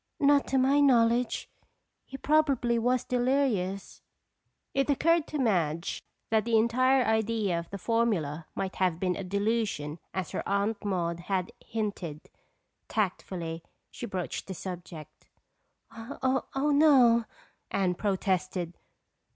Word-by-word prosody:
"Not 285 -1 +4
to 270 - +1
my 270 +2 +4
knowledge. 245 -3 +3 0.6
He 270 - -8
probably 275 -6 +2
was 250 +1 +1
delirious." 245 -7 0 0.7
It 275 +1 +1
occurred 330 +3 +3
to 305 - -4
Madge 170 - 0 0.3
that 220 -1 +3
the 230 -1 +2
entire 255 +4 +3
idea 220 -5 +1
of 170 - -9
the 200 - -5
formula 185 -9 0
might 190 -1 -3
have 180 -3 +1
been 180 -1 0
a 195 - -5
delusion 200 -6 -1
as 190 -3 -4
her - - -2
Aunt 205 +2 0
Maude 170 -4 -1
had 185 +2 -2
hinted. 200 -9 -5 0.6
Tactfully, 175 -5 -2 0.3
she 240 - -6
broached 185 -4 -4
the 190 - -5
subject. 170 -4 -9 0.6
"Oh, 260 +3 -2 0.3
no," 255 -6 +5 0.4
Anne 185 -2 +1
protested. 185 -3 -1
215 Hz, 120 wpm, -29 LUFS, 180-250 Hz, 0.7 s, no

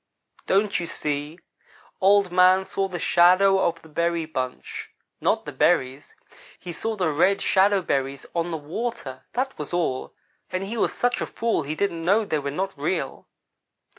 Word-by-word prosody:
Don't 200 +1 +2
you 170 - -4
see? 150 +1 -4 0.6
Old 195 -1 +4
man 185 +1 +5
saw 195 0 -1
the 180 -2 -5
shadow 185 +3 +5
of 170 -3 0
the - - -14
berry 170 +1 -1
bunch; 130 -5 -5 0.3
not - - +1
the - - -5
berries. 130 +2 +1 0.4
He 175 - -8
saw 220 +6 -3
the 180 -6 0
red 195 +7 +3
shadow 195 0 +3
berries 135 -2 -2
on 170 0 -1
the 165 - -2
water; 150 - -5
that 265 +2 -1
was 150 +3 -6
all, 165 -7 -2 0.3
and 185 +1 -2
he 205 +4 -5
was 230 - +1
such 245 0 0
a - - -2
fool 230 -6 -1
he 150 +1 -4
didn't 170 -3 -1
know 205 +6 +3
they 155 -6 -1
were 140 0 -3
not 190 +7 -3
real. 145 -1 -3
175 Hz, 170 wpm, -24 LUFS, 150-195 Hz, 0.6 s, man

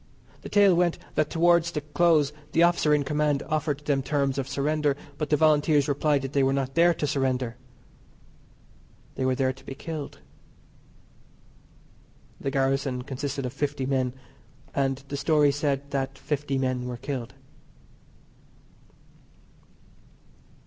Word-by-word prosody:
The - - -8
tale 205 -2 +5
went 175 -1 +2 0.2
that 155 -1 +1
towards 170 0 +3
the 155 -3 -3
close 150 -1 +2 0.2
the 165 - +4
officer 170 -3 +3
in 150 -1 +3
command 150 -1 0
offered 150 -2 -2
them 140 -2 +1
terms 140 -1 0
of 135 - -3
surrender, 145 0 0 0.2
but 150 - -2
the 150 - +3
Volunteers 150 -1 +3
replied 145 -1 +1
that 135 +1 -5
they 140 - +3
were 135 0 +3
not 135 -1 -2
there 170 +3 +4
to 150 - -2
surrender. 130 -4 -1 1.6
They 130 - -2
were 130 0 +2
there 130 0 +1
to 135 - -18
be 135 - -8
killed. 155 -1 -6 2.2
The 135 - -2
garrison 135 -1 0
consisted 135 +1 -4
of 125 - -4
fifty 145 -1 -2
men, 130 -2 0 0.6
and 135 -1 -1
the 140 - -3
story 145 0 +3
said 140 -1 -2
that 135 0 -2
fifty 145 -2 -2
men 130 -1 -1
were 125 -1 -5
killed. 130 -2 -5
140 Hz, 140 wpm, -26 LUFS, 135-150 Hz, 2.2 s, tale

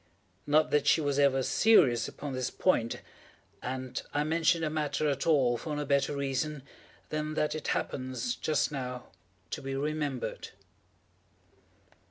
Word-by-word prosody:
Not 155 +2 +3
that 150 - +2
she - - +5
was 145 -2 0
ever 135 -2 +4
serious 140 - +4
upon 145 -2 -6
this 130 -1 -1
point—and 130 -2 -3
I 145 - +1
mention 165 +1 +2
the 155 -1 -1
matter 155 0 -1
at 140 0 -1
all 130 -7 +4
for 150 +4 -4
no 150 0 -2
better 140 0 +1
reason 140 +1 -2 0.5
than 155 0 -3
that 150 - +1
it 155 -1 -5
happens, 130 - -2
just 155 -1 0
now, 125 -3 -5 0.4
to - - -4
be 135 0 -4
remembered. 145 -2 -3
145 Hz, 140 wpm, -30 LUFS, 130-155 Hz, 0.5 s, she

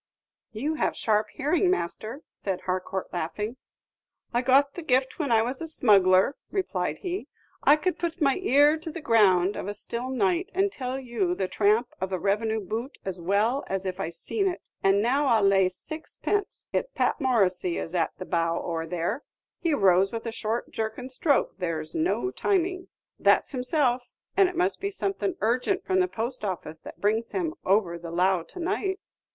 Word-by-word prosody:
"You 260 +8 -2
have 310 - 0
sharp 215 -1 +1
hearing, 320 +6 +1
master," 230 - -2
said 190 -2 -4
Harcourt, 185 +1 -3
laughing. 210 +8 -3 0.8
"I 240 - +2
got 275 +2 +4
the 350 - -6
gift 260 -2 +1
when 285 -6 -1
I 225 -1 +5
was 255 +5 -3
a 325 - -3
smuggler," 200 -5 +4 0.2
replied 385 -2 -1
he. 370 +1 -3 0.3
"I 290 - +6
could 360 +4 -2
put 340 0 -2
my 275 -4 +3
ear 295 -3 +4
to 320 - -6
the 330 +2 -6
ground 205 - +4
of - - -5
a 205 - -3
still 235 +4 -4
night, 195 -9 +1
and 390 +1 +2
tell 260 -3 -4
you 225 -9 -1
the 190 0 -1
tramp 215 +5 +2
of 190 0 -2
a 185 - 0
revenue 220 +4 0
boot 225 +7 -5
as 185 -2 -4
well 210 +9 +1
as 195 0 -2
if 185 -1 -3
I - - -2
seen 390 - -2
it. 360 - -5
And 195 +1 +3
now 275 +5 +2
I'll 225 -5 +4
lay 195 -1 +4
sixpence 320 - -4
it's - - 0
Pat - - 0
Morissy 185 -9 +2
is 165 - -4
at 170 -2 +1
the 185 - -6
bow 170 -1 0
oar 165 -1 -3
there; 180 - -2 0.4
he 330 -4 +1
rows 195 -3 +4
with 230 0 -5
a 230 - -2
short 225 +1 -3
jerking 220 +3 -4
stroke 275 +2 +1
there 165 -3 -2
's 155 - -3
no 350 +3 0
timing. 370 -2 0 0.3
That's - - +4
himself, 255 -2 0 0.2
and 390 -2 +5
it 365 - -8
must 360 +2 +1
be 400 - -1
something 390 -2 -2
urgent 255 - +1
from 375 0 +2
the 365 - +3
post 240 -4 -4
office 160 -5 -4
that - - -11
brings 220 +3 0
him 335 -4 -1
over 185 -3 +2
the 170 0 -7
lough 180 +1 +2
to - - -10
night." 380 +2 -1
235 Hz, 190 wpm, -27 LUFS, 190-310 Hz, 0.8 s, I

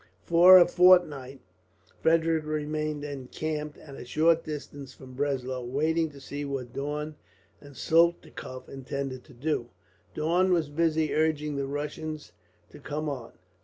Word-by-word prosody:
For 175 +2 +8
a 175 - +7
fortnight 175 -8 +4 0.6
Frederick 165 -1 +2
remained 155 0 -2
encamped, 150 +2 -5
at 145 - -13
a - - -8
short 160 +6 +2
distance 145 -3 -8
from 130 -1 -13
Breslau, 130 -2 -2
waiting 155 +6 0
to 140 -2 -14
see 145 +2 -6
what 135 -4 -5
Daun 150 +2 -4 0.4
and 145 -1 -15
Soltikoff 165 -6 0
intended 135 -1 -5
to - - -16
do. 125 -2 -2 0.5
Daun 175 +5 +2
was 165 -4 +1
busy 160 0 +1
urging 150 -1 0
the 140 -1 -2
Russians 150 +2 -5 0.4
to - - -13
come 150 +2 -4
on. 125 -5 -6
150 Hz, 135 wpm, -27 LUFS, 140-160 Hz, 0.6 s, For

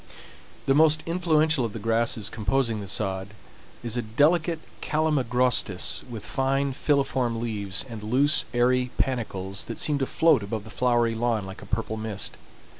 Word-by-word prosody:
The 135 - +3
most 155 +1 +4
influential 160 -4 +2
of 115 -3 -3
the - - -5
grasses 115 0 +1
composing 115 0 0
the 100 - -7
sod 95 +1 -2 0.5
is 120 0 -2
a - - +1
delicate 155 +9 +2 0.2
calamagrostis 125 - +1
with 110 -4 -7
fine 135 +1 0
filiform 130 -5 0
leaves, 105 -3 -1
and 115 -3 -8
loose, 135 +7 +3
airy 125 +1 +2
panicles 100 -7 -2
that - - -6
seem 145 -2 +1
to 135 - -1
float 160 -7 +3
above 100 +1 -4
the 110 - -11
flowery 120 -1 +1
lawn 115 -2 -1
like 95 0 -9
a 100 - -11
purple 110 +1 -3
mist. 110 -2 -3
120 Hz, 155 wpm, -25 LUFS, 110-135 Hz, 0.5 s, most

